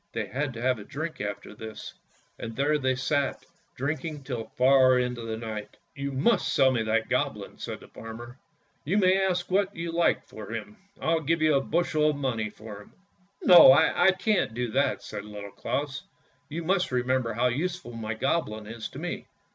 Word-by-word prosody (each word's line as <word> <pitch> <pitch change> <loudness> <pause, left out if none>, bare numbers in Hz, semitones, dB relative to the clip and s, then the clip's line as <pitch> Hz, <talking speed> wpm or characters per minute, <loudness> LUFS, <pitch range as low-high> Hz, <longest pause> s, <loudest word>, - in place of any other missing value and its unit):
They - - -2
had 140 +1 -2
to 115 - -6
have 130 -2 +2
a - - -8
drink 155 +5 -5
after 105 0 -5
this, 110 +1 -8 0.5
and 115 -1 -6
there 150 +2 +2
they 130 -1 +1
sat 140 +2 -1 0.3
drinking 150 +2 -3
till 125 -4 -4
far 130 0 +6
into 125 -1 -1
the 115 -1 -4
night. 110 -2 -6
" - - -44
You 140 -1 -3
must 140 - +2
sell 135 -1 +4
me 120 -3 0
that 110 0 0
Goblin," 130 -6 -2
said - - -6
the - - -13
farmer. 120 +3 -10 0.2
" - - -41
You 180 +8 0
may 190 -1 +4
ask 180 -1 -1
what 200 +1 +1
you 165 0 -4
like 170 +1 +2
for 110 -1 -9
him! 105 -1 -7 0.2
I'll 160 0 +1
give 160 +2 +1
you 155 -1 +4
a 135 - +3
bushel 155 0 +1
of 150 - 0
money 120 -6 -1
for 105 -1 -10
him." - - -18 0.3
" 195 +2 -38
No, 175 -1 +10
I 185 - +4
can't 190 - +1
do 120 -2 -2
that," 140 +3 +1
said 100 - -6
Little 105 -1 -8
Claus; 145 +5 -3 0.2
" - - -38
you 165 +3 -4
must 180 0 +1
re 125 -1 +1
member 130 -2 0
how 125 +3 +2
useful 170 +2 -3
my 110 -1 -4
Goblin 110 -4 -1
is 110 +1 -6
to - - -11
me." - - -5
130 Hz, 205 wpm, -27 LUFS, 115-160 Hz, 0.5 s, No